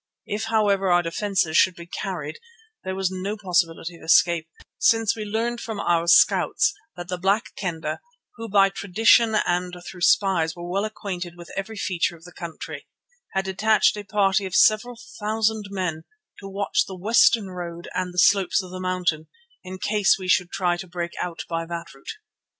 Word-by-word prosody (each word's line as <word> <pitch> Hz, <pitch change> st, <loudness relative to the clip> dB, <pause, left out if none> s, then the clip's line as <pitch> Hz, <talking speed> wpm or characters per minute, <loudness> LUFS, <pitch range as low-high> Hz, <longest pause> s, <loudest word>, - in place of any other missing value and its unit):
If, 215 Hz, +2 st, -3 dB
however, 205 Hz, -3 st, +2 dB
our 175 Hz, 0 st, +4 dB
defences 170 Hz, -2 st, 0 dB
should 185 Hz, -2 st, +4 dB
be 170 Hz, -, -10 dB
carried 175 Hz, -, -5 dB, 0.4 s
there 190 Hz, 0 st, -4 dB
was 190 Hz, -1 st, -1 dB
no 190 Hz, +3 st, -4 dB
possibility 175 Hz, -3 st, -1 dB
of -, -, -19 dB
escape, 165 Hz, 0 st, +3 dB, 0.3 s
since 225 Hz, -2 st, +3 dB
we 220 Hz, -, -5 dB
learned 230 Hz, +3 st, -2 dB
from 220 Hz, -3 st, -5 dB
our 170 Hz, -2 st, +1 dB
scouts 175 Hz, -, +4 dB, 0.2 s
that 175 Hz, 0 st, -7 dB
the 180 Hz, -1 st, -4 dB
Black 200 Hz, +5 st, 0 dB
Kendah, 160 Hz, -5 st, -4 dB, 0.4 s
who 230 Hz, -1 st, -7 dB
by 195 Hz, -1 st, +5 dB
tradition 220 Hz, +4 st, +3 dB
and 180 Hz, -3 st, 0 dB
through 180 Hz, -, -9 dB
spies 175 Hz, -4 st, +3 dB
were 175 Hz, 0 st, -8 dB
well 195 Hz, +4 st, -1 dB
acquainted 185 Hz, -5 st, -6 dB
with 175 Hz, 0 st, -11 dB
every 200 Hz, +3 st, -5 dB
feature 180 Hz, -3 st, -1 dB
of 165 Hz, -, -18 dB
the 180 Hz, -, -12 dB
country, 170 Hz, -2 st, -8 dB, 0.5 s
had 190 Hz, 0 st, 0 dB
detached 210 Hz, +4 st, +2 dB
a 210 Hz, -, -6 dB
party 195 Hz, -1 st, +1 dB
of 185 Hz, -, -5 dB
several 225 Hz, +4 st, +4 dB, 0.2 s
thousand 220 Hz, 0 st, 0 dB
men 180 Hz, -5 st, -3 dB, 0.3 s
to 195 Hz, -, -9 dB
watch 200 Hz, +1 st, 0 dB
the 190 Hz, -, -8 dB
western 215 Hz, 0 st, +3 dB
road 170 Hz, -1 st, -7 dB
and 185 Hz, -1 st, -2 dB
the 180 Hz, -, -13 dB
slopes 195 Hz, +1 st, +4 dB
of 180 Hz, -, -11 dB
the 185 Hz, 0 st, -6 dB
mountain, 180 Hz, -4 st, -1 dB, 0.4 s
in 185 Hz, 0 st, -7 dB
case 205 Hz, +1 st, +2 dB
we 185 Hz, -1 st, -7 dB
should 180 Hz, -1 st, +2 dB
try 175 Hz, -2 st, 0 dB
to 185 Hz, -, -8 dB
break 170 Hz, -1 st, -4 dB
out 175 Hz, -2 st, -5 dB
by 165 Hz, -1 st, -2 dB
that 170 Hz, 0 st, -7 dB
route. 135 Hz, -, -9 dB
185 Hz, 180 wpm, -24 LUFS, 175-205 Hz, 0.5 s, by